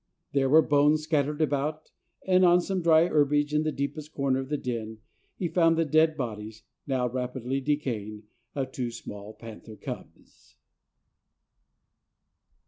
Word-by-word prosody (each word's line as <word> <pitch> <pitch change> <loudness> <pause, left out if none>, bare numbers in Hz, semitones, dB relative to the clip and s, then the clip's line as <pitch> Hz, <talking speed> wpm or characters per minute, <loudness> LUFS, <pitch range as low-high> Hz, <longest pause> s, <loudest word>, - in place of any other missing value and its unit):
There 135 -1 +1
were 155 +3 +7
bones 150 +2 +3
scattered 150 0 0
about, 150 +1 -2 0.3
and 185 0 +4
on 175 0 +6
some 185 +1 -2
dry 165 -1 +5
herbage 150 -2 +2
in 150 - +3
the 155 0 -1
deepest 150 +2 -5
corner 135 -2 0
of 135 0 -5
the 150 - 0
den, 115 -4 -4 0.4
he 180 - -2
found 165 -1 +3
the 165 - +2
dead 155 +1 +3
bodies, 110 -3 -5 0.2
now 130 -2 0
rapidly 125 +1 -3
decaying, 115 -7 -2 0.3
of 135 -2 -2
two 125 -2 -3
small 105 -2 -9
panther 110 0 -11
cubs. - - -10
145 Hz, 140 wpm, -27 LUFS, 125-155 Hz, 0.4 s, were